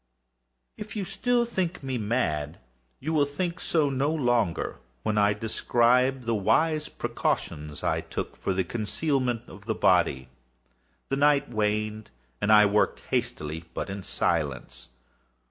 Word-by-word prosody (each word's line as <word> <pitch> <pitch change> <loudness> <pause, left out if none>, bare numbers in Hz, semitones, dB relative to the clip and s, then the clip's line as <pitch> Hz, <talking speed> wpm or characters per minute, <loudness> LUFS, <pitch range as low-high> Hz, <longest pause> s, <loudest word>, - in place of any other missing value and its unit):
If 210 0 -7
still 245 -1 +1
you - - +1
think 185 -8 -2
me 130 -2 -2
mad, 85 -10 -1 0.4
you 155 +5 -3
will 145 -2 +3
think 170 +5 -3
so 155 -6 +1
no 135 +3 +1
longer 120 - 0 0.2
when 110 - 0
I 100 0 +4
describe 125 +4 +2
the 115 0 0
wise 150 +10 +2
precautions 75 0 -3
I - - +1
took - - -5
for - - -2
the 95 0 +1
concealment 120 - -1
of 100 +1 -13
the 110 - 0
body. 65 -1 +2 0.8
The 135 - 0
night 145 -2 +3
waned, 110 0 -1 0.3
and 105 - +2
I 105 -1 +8
worked 105 +1 +2
hastily, 80 +2 -2
but - - -3
in 100 0 -5
silence. - - -2
120 Hz, 140 wpm, -27 LUFS, 105-145 Hz, 0.8 s, I